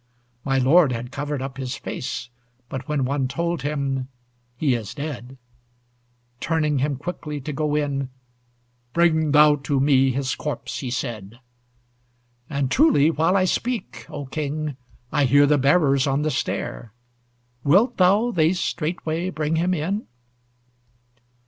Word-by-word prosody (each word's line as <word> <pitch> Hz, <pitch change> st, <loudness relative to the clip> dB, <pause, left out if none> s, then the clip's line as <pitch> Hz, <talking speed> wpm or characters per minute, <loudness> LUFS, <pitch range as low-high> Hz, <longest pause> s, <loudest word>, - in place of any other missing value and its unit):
My 135 Hz, -1 st, +1 dB
lord 140 Hz, +3 st, +5 dB
had 120 Hz, +2 st, -5 dB
covered 145 Hz, -1 st, -3 dB
up 135 Hz, -1 st, -6 dB
his 130 Hz, 0 st, -4 dB
face; 125 Hz, -2 st, -5 dB, 0.4 s
But 135 Hz, 0 st, -6 dB
when 145 Hz, -3 st, 0 dB
one 135 Hz, 0 st, 0 dB
told 170 Hz, +2 st, -2 dB
him, 135 Hz, -2 st, -2 dB, 0.5 s
"He 140 Hz, -1 st, +2 dB
is 115 Hz, -5 st, -4 dB
dead," 135 Hz, -4 st, -6 dB, 1.0 s
Turning 150 Hz, -3 st, 0 dB
him 140 Hz, +1 st, 0 dB
quickly 150 Hz, 0 st, -5 dB
to 150 Hz, +3 st, -5 dB
go 150 Hz, +1 st, -1 dB
in, 140 Hz, -3 st, -1 dB, 0.8 s
"Bring 160 Hz, -2 st, +3 dB
thou 150 Hz, 0 st, +6 dB
to 140 Hz, 0 st, -1 dB
me 135 Hz, -1 st, +4 dB
his 130 Hz, +1 st, -1 dB
corpse," 150 Hz, -5 st, -4 dB
he 130 Hz, -, -4 dB
said. 120 Hz, -4 st, -5 dB, 1.1 s
And 140 Hz, -2 st, -1 dB
truly 260 Hz, -, +5 dB
while 165 Hz, +5 st, +2 dB
I 185 Hz, -, +3 dB
speak, 235 Hz, +2 st, -2 dB
O 145 Hz, -1 st, -6 dB
King, 150 Hz, +1 st, -3 dB, 0.4 s
I 145 Hz, -2 st, +2 dB
hear 145 Hz, +3 st, +5 dB
the 145 Hz, 0 st, +3 dB
bearers 140 Hz, -1 st, +3 dB
on 140 Hz, +2 st, +1 dB
the 155 Hz, -, 0 dB
stair; 110 Hz, -, -3 dB, 0.7 s
Wilt 205 Hz, -, +4 dB
thou 200 Hz, +6 st, +4 dB
they 165 Hz, -4 st, +3 dB
straightway 170 Hz, -1 st, -2 dB
bring 160 Hz, -2 st, -1 dB
him 175 Hz, +3 st, +1 dB
in? 185 Hz, +7 st, -2 dB
145 Hz, 140 wpm, -23 LUFS, 135-160 Hz, 1.1 s, thou